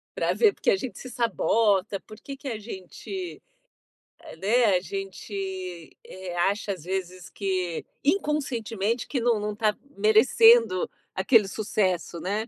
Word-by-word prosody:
pra - - +1
ver 435 -3 +4
porque - - +1
a - - +4
gente 235 +6 -6
se 255 - -9
sabota, 210 -4 +1
por 215 0 -13
que 275 +4 -8
que 275 - -10
a 230 -5 -2
gente 230 - -7 0.8
a - - -11
né, 230 +7 +3
a - - -1
gente, 190 -2 -6 0.2
eh, 185 -1 -8
acha 200 +3 +1
às 180 -6 -6
vezes, 185 -1 -4
que 185 -4 -2 0.2
inconscientemente 250 - 0
que 270 - -1
não 235 -2 +2
não 210 0 -2
tá 210 0 +1 0.2
merecendo 220 -1 +5 0.2
aquele 195 +1 +4
sucesso, 185 -5 -1
né. 205 +5 -2
210 Hz, 145 wpm, -26 LUFS, 190-235 Hz, 0.8 s, merecendo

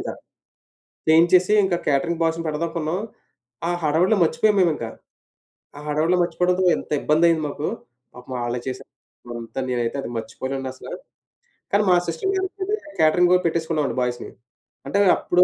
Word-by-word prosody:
కుదరలేదింకా. - - -4 1.0
చేయించేసి 175 +4 +5
ఇంకా 185 -2 +1
క్యాటరింగ్ 150 +4 +1
బాయ్స్‌ని 165 0 0
పెడదామనుకున్నాం. 160 +2 -2 0.7
ఆ - - 0
హడావిడిలో 165 +7 +3
మర్చిపోయాం 190 +6 +3
మేమింక 165 -9 +1 0.9
ఆ - - -8
హడావిడిలో 155 +4 +2
మర్చిపోవడంతో 180 +1 +1
ఎంత - - -9
ఇబ్బందైయింది 160 +1 +3
మాకు. 145 +2 -4 0.5
పాపం 125 +1 -9
ఆళ్ళే 120 +1 -2
చేసా 130 - -4 0.6
అంతా 115 +3 -7
నేనైతే 120 +1 -1
అది - - -6
మర్చిపోలేనండసల. 130 +3 -5 0.8
కాని 205 +1 +3
మా 180 - +6
సిస్టర్ 170 - -2
మ్యారేజ్‌కైతే 380 +1 -2 0.2
క్యాటరింగు 175 +3 +5
పెట్టేసుకున్నామండి 160 -6 -1
బాయ్స్‌‌ని 120 -1 -3 0.6
అంటే 200 - +1 0.2
అప్పుడు 180 +1 +3
160 Hz, 125 wpm, -23 LUFS, 140-180 Hz, 1.0 s, మా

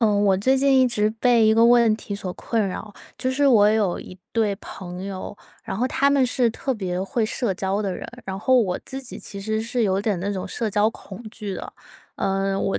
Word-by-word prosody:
呃， 225 - +4
我 200 -2 +3
最 260 +7 +3
近 270 0 +4
一 255 - +4
直 210 -3 +2
被 235 -3 +5
一 220 - +5
个 230 +1 +5
问 235 -2 +5
题 205 - -6
所 190 -2 -4
困 225 +1 -1
扰， 205 +3 -6 0.2
就 255 - -1
是 280 +2 +2
我 210 -6 +6
有 215 -5 +1
一 185 - -11
对 220 -3 +1
朋 185 -2 -8
友， 195 +1 -6 0.3
然 190 - -5
后 245 +5 +1
他 280 +2 +2
们 280 -2 +4
是 245 -1 +2
特 265 +4 -3
别 185 -4 -3
会 225 +4 -1
社 220 -2 -1
交 195 +2 -1
的 195 -3 -2
人， - - -7 0.2
然 190 0 -4
后 260 +5 +3
我 185 -5 -1
自 270 0 -5
己 255 -2 -8
其 200 - -7
实 220 +2 -1
是 235 +1 -1
有 195 -2 +1
点 205 -3 0
那 200 +3 -2
种 190 -2 -4
社 230 - -2
交 205 +2 +3
恐 195 -1 -11
惧 210 -3 -5
的。 - - -7 0.4
呃， 195 0 0
我 195 - 0
215 Hz, 250 characters per minute, -23 LUFS, 195-240 Hz, 0.4 s, 我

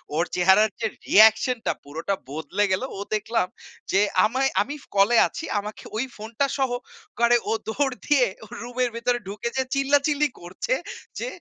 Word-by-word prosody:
ওর 165 +2 +2
চেহারার 190 +4 +5
যে 225 - +2 0.2
reaction 220 +4 +6
টা - - +3
পুরোটা 160 +7 -3 0.2
বদলে 160 +7 -1
গেলো। 190 +8 0
ও - - -6 0.2
দেখলাম 215 -2 0 0.4
যে, 195 - +4 0.3
আমায় 260 +5 +1
আমি 290 - -3
ফ - - -18
কলে 205 +4 +5
আছি 330 -2 -7
আমাকে 210 +1 -8
ওই 240 - 0
ফোনটা 225 +6 -2
সহ 265 -2 +1 0.5
করে 235 0 +5
ও - - +1 0.2
দৌড় 270 +3 0
দিয়ে 280 -4 +4 0.2
ও - - -15
রুমের 245 +1 -1
ভেতরে 240 +1 0
ঢুকে 205 +3 -4
যেয়ে 265 0 0
চিল্লাচিল্লি 285 +2 +2
করছে 180 - -3 0.5
যে, - - -3
235 Hz, 170 wpm, -24 LUFS, 200-265 Hz, 0.5 s, reaction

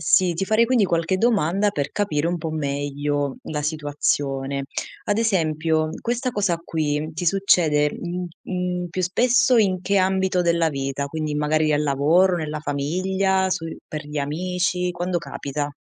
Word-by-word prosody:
Sì, 185 -2 +3
ti 180 - -1
farei 220 +4 +3
quindi 240 -4 +3
qualche 170 +1 +1
domanda 200 -2 +2
per 145 -6 -2
capire 170 -6 0
un 175 - -1
po' 160 0 -4
meglio 145 -1 -2
la 150 -1 -3
situazione. 140 -2 -1 0.4
Ad 205 +1 +1
esempio: 160 -6 +1
questa 245 +2 -1
cosa 195 -6 0
qui 155 -1 -1
ti 175 +2 -3
succede, 160 -6 +3
mhmm, 175 +1 -4 0.2
mhmm, 180 -1 -3
più 185 +1 -2
spesso 245 +6 +3
in 190 -4 +2
che 200 +2 +1
ambito 190 -1 +2
della 170 -1 +2
vita, 135 0 -3
quindi 155 0 -3
magari 155 +1 +1
al 150 0 +2
lavoro, 155 +6 +3
nella 155 -2 -4
famiglia, 190 +6 0
sui 165 -3 -3
per 150 -1 -6
gli 150 0 -4
amici, 180 +4 -1
quando 175 0 -1
capita? 145 -2 -4
170 Hz, 155 wpm, -23 LUFS, 150-190 Hz, 0.4 s, Sì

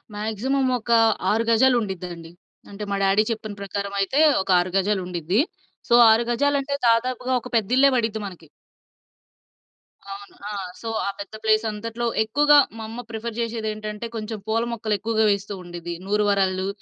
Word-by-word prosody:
Maximum 235 +6 -1
ఒక 235 - -5 0.4
6 225 +2 +1
గజాలుండిద్దండి. 190 -9 0 0.4
అంటే 205 +1 -7
మా 200 - +1
డాడీ 195 +2 +3
చెప్పిన 215 -2 -5
ప్రకారమైతే 200 +5 -2 0.2
ఒక 190 - -7
6 180 0 -2
గజాలుండిద్ది. 185 -1 0 0.5
సో, - - +3 0.2
6 225 +2 +4
గజాలంటే 280 +2 0 0.2
దాదాపుగా 250 +2 +1
ఒక 250 - -9
పెద్దిల్లే 250 +6 +4
పడిద్ది 225 -2 0
మనకి. 180 -4 -10 1.6
అవును. 200 0 -9
ఆ! - - -5 0.3
సో, 230 - -7 0.2
ఆ - - +1
పెద్ద 200 +1 -8
ప్లేసంతట్లో 220 +1 0 0.2
ఎక్కువగా 290 +6 +4 0.2
మా 225 - -6
అమ్మ 235 +2 -6
ప్రిఫర్ 225 0 -5
జేషేదేంటంటే 215 -1 -4
కొంచెం 220 0 -4
పూల 225 +1 +1
మొక్కలెక్కువగా 220 0 0
వేస్తూ 200 0 -2
ఉండిద్ది. 175 0 -7
నూరు 210 +1 +1
వరాలు, 190 -1 +1
215 Hz, 135 wpm, -23 LUFS, 200-230 Hz, 1.6 s, 6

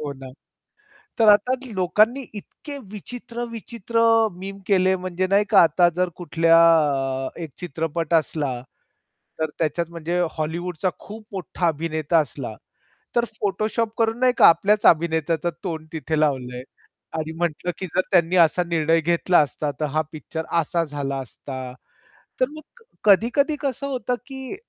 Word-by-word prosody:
हो 145 -2 -4
ना. 130 -1 -11 0.9
तर 225 -2 +5
आता 250 +5 +2 0.2
लोकांनी 215 +8 +2
इतके 285 +7 -9 0.2
विचित्र-विचित्र 235 0 -6 0.4
मीम 195 +1 -7
केले 190 -2 +3
म्हणजे 185 0 -2
नाही 200 +2 +3
का, 205 - +7
आता 175 +2 +4
जर 180 0 +1
कुठल्या 165 -1 +3 0.7
अ, - - -2
1 160 - -6
चित्रपट 165 0 -3
असला 145 -6 0 0.8
तर 160 -1 0
त्याच्यात 165 +1 0
म्हणजे 170 +1 -3
हॉलिवूडचा 170 +3 -2
खूप 215 +2 -10
मोठा 185 -2 -2
अभिनेता 160 0 0
असला, 145 -7 -4 0.6
तर 240 0 +3
फोटोशॉप 215 +2 -1
करून 225 +1 +1
नाही 255 -1 +4
का, - - +8
आपल्याच 205 +6 +4
अभिनेत्याचं 160 0 +3
तोंड 160 -4 -4
तिथे 155 0 -2
लावलंय. 125 -4 -1 0.5
आणि 160 0 -3
म्हटलं, 175 +1 -1
की 190 - -4
जर 185 - +4
त्यांनी 175 -1 +3
असा 170 +3 +1
निर्णय 165 -1 +2
घेतला 170 +2 +3
असता 145 0 0
तर 155 - 0
हा 155 - +3
पिक्चर 160 +1 -6
असा 170 +1 0
झाला 140 -2 -4
असता. 130 0 -8 0.7
तर 255 - +3
मग 310 +1 -10 0.2
क 470 - -19 0.2
कधी-कधी 245 - +4
कसं 275 0 -2
होतं 250 -3 -2
की 265 +4 -7
175 Hz, 145 wpm, -23 LUFS, 155-210 Hz, 0.9 s, का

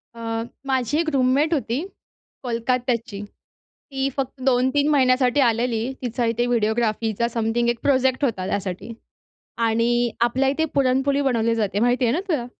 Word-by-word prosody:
अ, - - -11 0.5
माझी 265 +1 0
एक 330 -1 0
रूममेट 275 +4 +2
होती, 265 -3 -1 0.6
कोलकात्याची. 235 -3 -2 0.7
ती 270 0 -1
फक्त 270 -1 -4
2-3 260 +3 +2
महिन्यासाठी 255 -1 +3
आलेली. 235 0 +1
तिचा 245 0 -2
इथे 240 +1 -1
व्हिडिओग्राफीचा 225 -1 0
समथिंग 230 0 -1
एक 240 0 0
प्रोजेक्ट 265 0 +2
होता 200 -8 -1
त्यासाठी 195 +2 -4 0.8
आणि 235 +1 +1
आपल्या 255 +3 +2
इथे 320 +4 0
पुरणपोळी 275 +1 +2
बनवली 230 -4 +1
जाते 205 -2 -1
माहिती 245 +2 +2
आहे 235 - +2
ना 320 - 0
तुला? 300 -10 -1
245 Hz, 140 wpm, -22 LUFS, 230-265 Hz, 0.8 s, महिन्यासाठी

